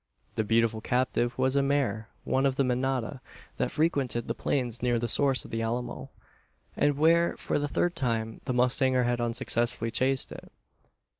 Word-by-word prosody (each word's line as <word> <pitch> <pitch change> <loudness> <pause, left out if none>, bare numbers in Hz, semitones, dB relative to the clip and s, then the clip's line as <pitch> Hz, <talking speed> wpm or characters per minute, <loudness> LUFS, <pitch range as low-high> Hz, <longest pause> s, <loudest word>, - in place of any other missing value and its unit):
The 110 - 0
beautiful 115 0 +1
captive 125 0 0
was 130 +1 +1
a 140 - +4
mare 135 -6 0
one 135 +1 +2
of 135 0 -2
a - - +5
manada 130 0 -1 0.4
that - - 0
frequented 140 -7 0
the 115 - -1
plains 120 -3 -1
near 120 -1 +2
the 120 +1 -1
source 135 +3 +2
of - - -11
the 115 - -2
Alamo; 120 +2 -3 0.7
and 145 -1 +2
where, 170 +3 +3
for - - -1
the 145 - -1
third 175 +4 0
time, 115 -6 -2
the 130 - -1
mustanger 125 +1 +2
had 120 0 0
unsuccessfully 120 0 -1
chased 130 +2 +1
it. - - -10
125 Hz, 170 wpm, -28 LUFS, 115-135 Hz, 0.7 s, a